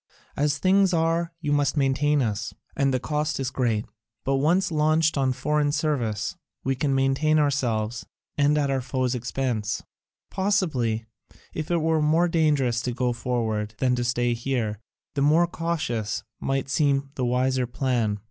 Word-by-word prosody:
As 145 +1 +1
things 190 +2 +3
are, 165 +1 +1
you 145 -3 -1
must 145 0 +1
maintain 140 +1 +2
us, 105 -2 -3 0.2
and 135 -1 +2
the 130 - +1
cost 150 +2 -2
is 135 -1 -2
great; 115 -5 0 0.4
but 135 0 +1
once 175 +7 +2
launched 155 +1 +2
on 135 -2 +2
foreign 150 +3 0
service, 125 -9 -1 0.3
we 135 - +1
can 135 +1 0
maintain 135 +3 +2
ourselves, 120 -6 0 0.3
and 145 +1 +3
at 140 -2 +1
our 135 -1 0
foe's 130 0 -1
expense. 120 -3 -2 0.5
Possibly, 155 - 0 0.5
if 155 -1 -4
it 170 -2 +1
were 160 -1 +2
more 160 +3 +3
dangerous 145 -8 +2
to 125 - -2
go 125 0 0
forward 110 -3 -2
than 125 +1 +2
to 120 - -1
stay 120 0 +1
here, 115 -4 -2 0.3
the 140 - -1
more 155 +4 +5
cautious 155 -11 -2 0.2
might 135 0 -1
seem 140 -1 +1
the 130 - -3
wiser 125 +1 +1
plan. 120 -4 0
135 Hz, 155 wpm, -25 LUFS, 120-150 Hz, 0.5 s, more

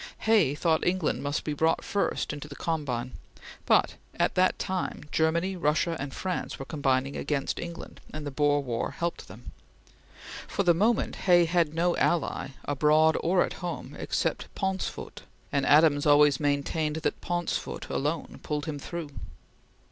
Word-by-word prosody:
Hay 215 -11 +3
thought 160 +1 +1
England 180 -3 0
must 145 +1 -2
be 150 - -2
brought 160 +2 +1
first 200 -6 -1
into 145 0 -7
the 145 - -10
combine; 130 -8 -2 0.6
but - - +3 0.2
at - - +1
that 185 0 +3
time 185 -1 -3
Germany, 170 +4 +1
Russia, 165 0 +1
and 135 0 -4
France 185 +4 -3
were - - -6
all - - -16
combining 135 -3 0
against 140 -1 -2
England, 170 -1 -8
and 155 -1 -6
the 145 - -4
Boer 145 +1 +2
War 120 -3 -2
helped 170 +4 -4
them. - - -11 1.0
For 200 - -1
the 175 -2 +5
moment 215 +7 +1
Hay 175 -1 +6
had 165 -2 +1
no 175 +1 +2
ally, 170 -4 0 0.2
abroad 155 +2 +4
or 180 +2 +3
at - - -6
home, 175 -1 -5
except - - -1
Pauncefote, 190 -1 -3 0.3
and 140 -1 +1
Adams 145 -1 +5
always 145 -2 +5
maintained 150 +1 0
that 160 - -2
Pauncefote 175 -1 -3
alone 150 +3 -3
pulled 150 -1 -3
him 150 -2 -4
through. 165 0 -6
155 Hz, 155 wpm, -28 LUFS, 145-175 Hz, 1.0 s, Hay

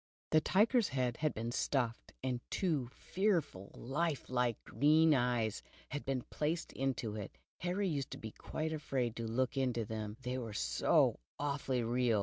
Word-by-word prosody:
The 155 - +6
timer's 225 +6 +4
head 125 -3 0
had 155 -1 +1
been 115 +2 -2
stuffed, 120 -2 0
and 130 -2 0
tvvo 150 -10 0
fearfully 170 - 0
life 145 +2 -2
like, 125 -3 +1
green 155 +2 +5
eyes 120 -5 +1 0.3
had 145 - -4
been 135 -2 -1
placed 160 +3 -2
in 135 -1 0 0.2
it 105 - -7 0.2
Harr\ 180 +3 -1
used 145 -8 -1
to - - -6
be 110 - -7
quite 160 +7 -3
afraid 130 -6 -1
to 115 -1 -2
look 130 +4 0
into 125 -4 +1
them, 110 -1 -4
they 125 +1 -2
were 115 -4 -5
so 65 -11 +3 0.2
awfully 140 -3 0
real. 120 -1 +2
130 Hz, 160 wpm, -35 LUFS, 115-155 Hz, 0.3 s, The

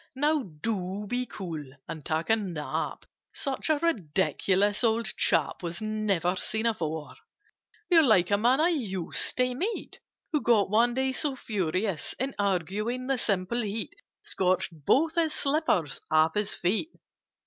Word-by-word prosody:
Now 295 +2 +2 0.2
do 200 -2 -2
be 250 +3 -1
cool 165 -6 -6 0.2
and 155 -2 -6
take 160 +6 -1
a - - +7
nap! 180 -9 -4 0.3
Such 275 +2 -2
a 310 - +4
ridiculous 200 - +1
old 230 0 +2
chap - - +1
Was 170 -1 -4
never 210 -5 0
seen 220 +4 0
before! 160 -9 -2 0.7
"You're 340 -3 +6
like 210 - +4
a 200 - +4
man 245 +5 +3
I 325 +3 +4
used 200 - -2
to 250 0 +2
meet, 390 - -4 0.3
Who 300 -3 +1
got 210 -5 +3
one 235 +3 +3
day 265 0 +1
so 275 +1 -1
furious 190 -5 -2
In 265 +2 -2
arguing, 205 +6 -1
the 270 -1 0
simple 200 +3 0
heat 215 0 -3 0.3
Scorched 185 -1 +1
both 270 - +2
his 330 -2 +1
slippers 275 - 0
off 160 +1 +4
his 210 -1 0
feet!" 205 - 0
215 Hz, 150 wpm, -28 LUFS, 180-255 Hz, 0.7 s, a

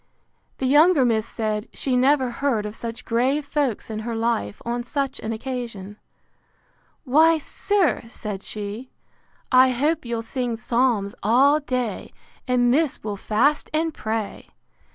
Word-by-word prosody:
The 265 - -2
younger 295 +1 +5
miss 225 -2 +1
said, 215 0 -3
She 260 -2 -1
never 260 0 +3
heard 240 -6 -1
of 210 +1 -5
such 230 +1 -6
grave 260 +5 +1
folks 280 -7 -2
in 215 - -4
her 230 +1 -4
life, 225 - -1
on 240 +1 -2
such 275 +2 -3
an 220 - -4
occasion: 225 -4 -5 1.1
Why, 320 +4 +5
sir, 370 - +1
said 210 -4 -6
she, 210 +5 -6 0.6
I 255 +1 +7
hope 295 +6 0
you'll 235 -2 -3
sing 240 0 -3
psalms 235 -4 0
all 270 +8 +4
day, 250 -7 -3 0.3
and 245 -1 +3
miss 300 +1 +1
will 210 -1 -3
fast 245 +9 +1
and 320 0 0
pray! 220 -3 -4
245 Hz, 140 wpm, -23 LUFS, 220-275 Hz, 1.1 s, I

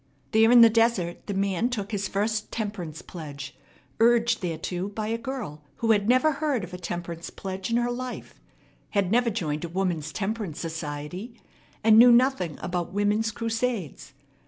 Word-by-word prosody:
There 220 +1 +5
in 240 0 +8
the 230 - +9
desert 225 -7 +1
the 200 - -3
man 195 +3 +1
took 210 -4 -4
his 200 -2 -1
first 210 +2 -1
temperance 190 -8 -5
pledge, 145 -5 -8 0.4
urged 235 +1 +4
thereto 175 +1 -3
by 210 +1 -4
a 230 - 0
girl 230 - -5
who 225 -1 +1
had 205 0 +2
never 255 +5 +4
heard 285 -6 -1
of 180 - -8
a 180 - -6
temperance 175 -1 -5
pledge 190 +1 -5
in 230 - +2
her 240 0 +1
life, 250 +1 -6 0.6
had 195 -2 +2
never 240 +1 +3
joined 160 -8 -2
a 170 - -4
woman's 170 -4 -2
temperance 200 -5 -3
society, 160 - -6 0.4
and 220 0 +7
knew 245 +1 +9
nothing 235 - +3
about 175 -1 -2
women's 205 +3 +1
crusades. 225 - -3
205 Hz, 165 wpm, -26 LUFS, 175-230 Hz, 0.6 s, the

